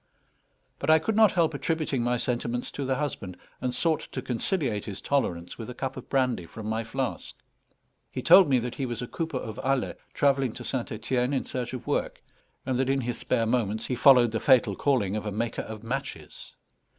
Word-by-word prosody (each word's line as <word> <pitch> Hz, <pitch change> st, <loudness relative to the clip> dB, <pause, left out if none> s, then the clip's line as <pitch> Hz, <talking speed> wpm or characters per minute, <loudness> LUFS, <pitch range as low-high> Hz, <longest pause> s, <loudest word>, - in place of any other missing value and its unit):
But -, -, -2 dB
I 160 Hz, -, +8 dB
could 205 Hz, +7 st, -1 dB
not 220 Hz, -2 st, +6 dB
help 165 Hz, -3 st, +2 dB
attributing 150 Hz, -3 st, -1 dB
my 120 Hz, +1 st, +1 dB
sentiments 120 Hz, 0 st, -2 dB
to 140 Hz, -, -4 dB
the 130 Hz, 0 st, +1 dB
husband, 125 Hz, -10 st, -4 dB, 0.2 s
and 125 Hz, 0 st, 0 dB
sought 160 Hz, +5 st, +1 dB
to 130 Hz, -, -3 dB
conciliate 125 Hz, -, -1 dB
his 100 Hz, -2 st, -5 dB
tolerance 90 Hz, -12 st, -1 dB
with 115 Hz, -, -6 dB
a 125 Hz, -, -7 dB
cup 135 Hz, -1 st, -3 dB
of -, -, -9 dB
brandy 125 Hz, -10 st, +1 dB
from 110 Hz, +5 st, -9 dB
my 110 Hz, +1 st, -1 dB
flask. 125 Hz, +3 st, -4 dB, 0.7 s
He 130 Hz, -, -5 dB
told 180 Hz, -1 st, +8 dB
me 130 Hz, -, +4 dB
that 125 Hz, 0 st, -2 dB
he 135 Hz, -, -3 dB
was 120 Hz, 0 st, -3 dB
a -, -, -5 dB
cooper 160 Hz, -1 st, -3 dB
of 110 Hz, -4 st, -6 dB
Alais 135 Hz, -1 st, +1 dB, 0.2 s
travelling 135 Hz, -4 st, +2 dB
to -, -, -8 dB
St. 125 Hz, -3 st, -3 dB
Etienne 125 Hz, +4 st, -1 dB
in 135 Hz, -, 0 dB
search 125 Hz, -1 st, -4 dB
of 125 Hz, -, -6 dB
work, -, -, -2 dB, 0.4 s
and 130 Hz, -1 st, 0 dB
that 130 Hz, 0 st, +1 dB
in 135 Hz, 0 st, +2 dB
his 120 Hz, -1 st, -3 dB
spare 115 Hz, -3 st, +1 dB
moments 110 Hz, -2 st, 0 dB
he 125 Hz, -, -1 dB
followed 125 Hz, -3 st, +6 dB
the 115 Hz, -, -1 dB
fatal 125 Hz, -7 st, +4 dB
calling 110 Hz, -8 st, +1 dB
of 110 Hz, 0 st, -3 dB
a -, -, -2 dB
maker 115 Hz, +3 st, -2 dB
of 110 Hz, -1 st, -8 dB
matches. 135 Hz, +4 st, -6 dB
125 Hz, 210 wpm, -27 LUFS, 115-135 Hz, 0.7 s, I